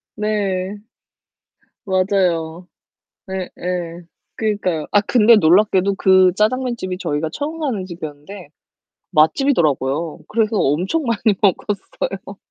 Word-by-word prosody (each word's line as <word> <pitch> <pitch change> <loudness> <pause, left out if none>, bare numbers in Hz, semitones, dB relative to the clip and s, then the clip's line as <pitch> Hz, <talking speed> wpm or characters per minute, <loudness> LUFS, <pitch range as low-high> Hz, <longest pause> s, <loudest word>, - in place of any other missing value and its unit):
네. 205 -2 -2 1.0
맞아요. 185 -3 0 0.6
예예. 180 -2 -4 0.3
그러니까요. 200 -8 -1
아 205 - +5
근데 230 +1 +5
놀랍게도 195 +1 +3
그 185 -1 +4
짜장면집이 220 -4 -1
저희가 155 -2 -2
처음 310 +3 -5
가는 230 -11 -2
집이었는데 165 +1 -9 0.6
맛집이더라고요. 155 - +1
그래서 220 0 0
엄청 185 - 0
많이 225 -3 +1
먹었어요. 195 -1 -2
190 Hz, 260 characters per minute, -19 LUFS, 170-210 Hz, 1.0 s, 아